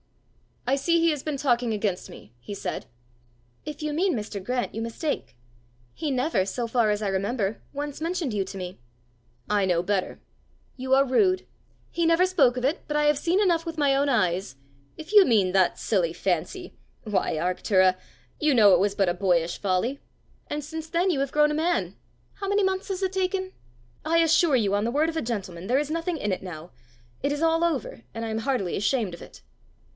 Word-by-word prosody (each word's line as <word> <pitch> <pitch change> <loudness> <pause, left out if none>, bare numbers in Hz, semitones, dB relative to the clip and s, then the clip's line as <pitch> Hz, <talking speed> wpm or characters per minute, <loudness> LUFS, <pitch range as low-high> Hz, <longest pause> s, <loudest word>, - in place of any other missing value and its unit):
"I 260 +3 +2
see 335 +4 +2
he 335 0 +4
has 295 -3 -3
been 300 -1 -3
talking 245 -4 +1
against 205 -3 -2
me!" 105 +2 -13
he 205 - -8
said. - - -4 0.8
"If 300 0 -6
you 305 -1 -2
mean 360 +2 +1
Mr. 210 -3 -5
Grant, 250 +3 -2
you 225 - -4
mistake. 230 - -3 0.6
He 310 -2 -3
never, 255 - +1
so 235 +5 -3
far 230 -1 +2
as 210 0 0
I - - 0
remember, 200 +2 -1
once 290 +1 -5
mentioned 330 -6 -2
you 200 -2 0
to 195 - -8
me." 180 -1 -7 0.7
"I 205 -2 +2
know 175 -2 +1
better!" 195 -1 -1 0.6
"You 260 +1 +2
are 275 +1 +4
rude. 370 +8 +2 0.5
He 340 - 0
never 335 +2 +4
spoke 285 -10 +3
of 250 - -3
it; 290 +5 +1
but 295 - -3
I 300 - +2
have 295 -1 +3
seen 345 +6 +1
enough 340 -4 +2
with 330 -1 -5
my 285 -2 +3
own 280 +1 +2
eyes 185 - 0 0.2
" 140 +1 -34
"If 315 +2 -8
you 415 -3 +8
mean 205 -7 +3
that 185 -1 +3
silly 180 -6 0
fancy 180 - -2 0.3
why, 210 -3 0
Arctura! 185 +3 +2 0.4
you 300 -3 +3
know 205 -4 +7
it 175 - +5
was 200 +1 +1
but 195 -3 +2
a - - +1
boyish 175 -2 +1
folly!" 205 +8 0 0.5
"And 295 0 -4
since 320 +2 -6
then 345 +4 +1
you 290 - -1
have 275 -1 -2
grown 300 0 +4
a - - -1
man! 335 +3 0 0.4
How 395 - -5
many 405 +1 +2
months 380 0 0
has 385 -1 -3
it 375 - 0
taken?" 375 0 -1 0.5
"I 330 +1 +3
assure 325 -2 +4
you, 205 -5 +1
on 205 +1 +1
the 235 - 0
word 305 +5 +2
of 325 - -4
a - - 0
gentleman, 190 -6 -5
there 255 +4 +3
is 300 +1 -3
nothing 330 +1 -2
in 210 -8 -2
it 185 - -2
now. 175 -2 -8 0.5
It 280 - 0
is 290 +1 -2
all 330 0 +3
over, 275 - -2
and 230 - -3
I - - -4
am 220 0 -2
heartily 225 -7 -1
ashamed 205 -1 0
of 170 - -10
it." - - -13
255 Hz, 210 wpm, -26 LUFS, 195-320 Hz, 0.8 s, you